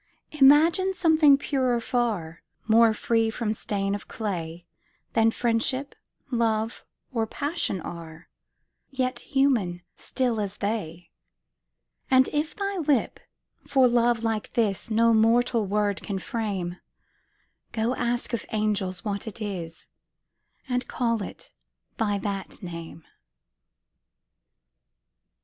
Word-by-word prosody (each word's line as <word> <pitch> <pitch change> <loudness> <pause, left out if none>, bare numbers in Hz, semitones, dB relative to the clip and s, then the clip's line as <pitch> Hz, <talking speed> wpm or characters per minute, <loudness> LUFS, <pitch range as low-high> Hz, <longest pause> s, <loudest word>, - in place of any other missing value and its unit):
Imagine 315 +7 +5
something 315 -5 +5
purer 260 -4 0
far, 225 -10 -2 0.3
More 225 0 +6
free 225 +1 +1
from 220 -1 -2
stain 200 -2 -2
of 205 - -5
clay 175 -6 -4 0.5
Than 225 0 +4
Friendship, 245 +4 -1 0.4
Love, 225 -2 0 0.3
or 225 -2 0
Passion 285 - -2
are, 165 0 -9 0.6
Yet 255 -2 -1
human, 235 -11 +1
still 245 -4 -1
as 200 0 -4
they: 180 -6 -4 1.0
And 260 0 +5
if 300 +2 -2
thy 400 -1 -2
lip, 290 -6 +1 0.5
for 265 -2 +5
love 240 -1 +2
like 225 -2 -2
this, 220 -1 0
No 230 +1 +4
mortal 225 0 +3
word 205 0 0
can 200 - -3
frame, 195 -5 -3 0.9
Go, 225 +2 0
ask 240 0 -2
of 235 - -1
angels 205 -4 -1
what 200 +1 -3
it 220 - -7
is, 175 -6 -5 0.8
And 250 -1 -1
call 230 -3 0
it - - -8 0.5
by 205 -3 +1
that 200 0 -5
name! 170 -2 -8
225 Hz, 110 wpm, -26 LUFS, 200-255 Hz, 1.0 s, More